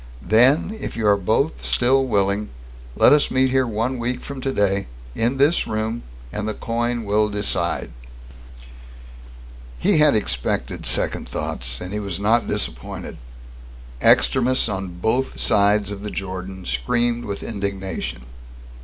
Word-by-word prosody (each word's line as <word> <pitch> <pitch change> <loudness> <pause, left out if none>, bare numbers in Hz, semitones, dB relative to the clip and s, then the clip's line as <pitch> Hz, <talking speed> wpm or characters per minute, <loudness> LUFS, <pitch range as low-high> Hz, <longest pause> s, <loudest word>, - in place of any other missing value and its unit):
Then, 130 - +4
if - - -5
you 110 - -1
are 100 -1 +5
both 110 - 0
still 130 +2 +2
willing, 100 -3 0 0.5
let - - +6
us 150 - +3
meet 130 0 +2
here 130 -1 +2
one 115 +3 -2
week 125 +1 -2
from 140 -2 -7
today, 100 -7 0 0.3
in 120 - 0
this 145 +5 +3
room 110 +2 -2 0.3
and 105 0 -3
the 110 - -2
coin 120 0 -2
will 105 +1 +2
decide!" 100 -8 -2 1.9
He 60 - +2
had 150 -3 +6
expected 65 - -1
second - - +1
thoughts, - - -4
and 90 +2 -6
he 105 - -2
was 100 -3 -4
not 110 +3 +2
disappointed. - - -4 0.8
Extremists 90 - +4
on 95 -4 -4
both 115 +8 -1
sides 105 0 +3
of 100 -1 -6
the 105 - -4
Jordan 95 -1 -6
screamed 120 - 0
with 100 -1 -5
indignation. 100 - -4
105 Hz, 135 wpm, -22 LUFS, 95-120 Hz, 1.9 s, let